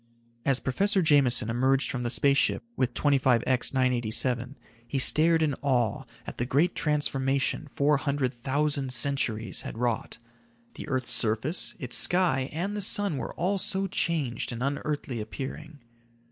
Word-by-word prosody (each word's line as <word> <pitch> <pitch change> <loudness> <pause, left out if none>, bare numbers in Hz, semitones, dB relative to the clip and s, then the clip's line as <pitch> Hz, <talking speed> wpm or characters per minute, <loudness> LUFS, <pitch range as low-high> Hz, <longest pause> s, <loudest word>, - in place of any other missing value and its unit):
As 135 -2 +3
Professor 195 +8 +1
Jameson 135 -7 +3
emerged 130 +3 +1
from 125 - -4
the 120 - -2
space 140 +2 +3
ship - - 0
with 125 -2 -1
25X 130 -3 +2
987, 125 0 0 0.3
he 135 - -3
stared 160 +4 +4
in 150 -2 +1
awe 125 -6 0 0.2
at - - -9
the 120 - 0
great 150 +8 +2
transformation 140 -1 0
four 145 +1 +1
hundred 140 -2 -2
thousand 140 +2 -1
centuries 115 -6 0
had - - -8
wrought. 120 -1 -2 0.6
The - - -9
earth's 130 -4 -2
surface, 115 +9 -1
its 125 -6 0
sky 170 -8 +2
and 185 +7 -3
the 205 - -3
sun 200 -4 0
were 120 - -6
all 190 +3 -1
so 190 +1 +2
changed 165 -11 -2
and 120 +1 -5
unearthly 140 -3 -3
appearing. 140 +7 -7
135 Hz, 145 wpm, -27 LUFS, 125-150 Hz, 0.6 s, stared